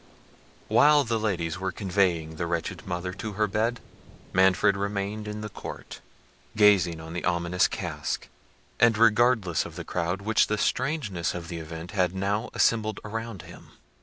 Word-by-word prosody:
While 150 0 +5
the 115 -2 -1
ladies 90 -6 -2
were 95 0 -2
conveying 90 -5 0
the 85 - -2
wretched 90 +3 -3
mother 90 0 -3
to 105 +2 -6
her 105 +2 +1
bed, 110 +4 -1 0.5
Manfred 95 +1 +4
remained 100 +1 -3
in 105 0 -5
the 105 - -5
court, - - -9 0.5
gazing 95 -6 +4
on 80 0 -8
the 85 - -4
ominous 85 0 +2
casque, - - -4 0.5
and 115 -2 +5
regardless 110 -5 +3
of 80 - -10
the 85 -1 -6
crowd 90 +3 -2
which 110 +1 +3
the 105 - 0
strangeness 120 - -1
of 85 -1 -6
the 85 -2 -5
event 80 +2 -8
had 95 -3 0
now 100 +5 -1
assembled 110 -2 +2
around 115 -4 -5
him. - - -14
100 Hz, 160 wpm, -27 LUFS, 85-110 Hz, 0.5 s, While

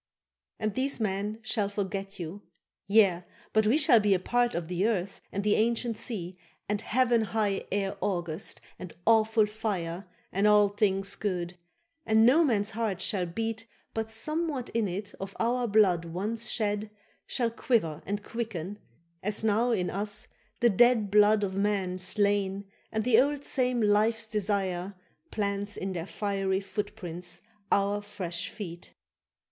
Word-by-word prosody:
—And 215 -2 -1
these 270 +3 -1
men 205 0 -1
shall 210 -2 0
forget 195 -1 -4
you.—Yea, 190 +1 0 0.3
but 220 -1 +4
we 245 +7 +4
Shall 275 -6 +6
be 205 -2 +3
a - - 0
part 240 +5 +1
of 170 -1 -2
the 180 +4 +1
earth 195 -4 -2
and 200 - -2
the 210 0 +3
ancient 235 +1 +1
sea, 185 -6 -5 0.3
And 210 0 -1
heaven 240 0 +2
high 210 -2 -1
air 195 0 -1
august, 175 -5 -3 0.2
and 180 - -8
awful 220 -1 +4
fire, 200 -5 -3 0.2
And 200 +2 +2
all 210 -1 +6
things 195 -1 +1
good; 180 -4 -3 0.5
and 220 -2 +4
no 290 +8 +6
man's 215 -7 +1
heart 220 -4 -2
shall 185 -2 0
beat 225 +5 -3 0.3
But 220 0 -2
somewhat 305 +3 -2
in 230 -3 0
it 195 +3 -5
of 195 0 -6
our 240 +1 +1
blood 195 -6 +4
once 215 +7 -2
shed 210 -1 -1 0.4
Shall 235 -3 0
quiver 190 - 0
and 205 +1 -3
quicken, 210 -5 -5 0.4
as 210 +2 -2
now 220 +3 +2
in 190 -7 0
us 205 +2 -2 0.3
the 240 - +6
dead 225 -1 +4
Blood 210 0 +5
of 190 -1 -2
men 195 -2 0
slain 200 +1 +1 0.3
and 220 0 -1
the 240 0 +6
old 285 +1 -1
same 250 -3 +1
life's 215 +2 +3
desire 195 -3 -1 0.3
Plants 205 -1 -2
in 190 0 -3
their 170 0 -4
fiery 195 -2 -1
footprints 190 -3 -5 0.3
our 200 +1 +2
fresh 185 -3 -5
feet. 175 -4 -8
205 Hz, 150 wpm, -29 LUFS, 190-225 Hz, 0.5 s, Shall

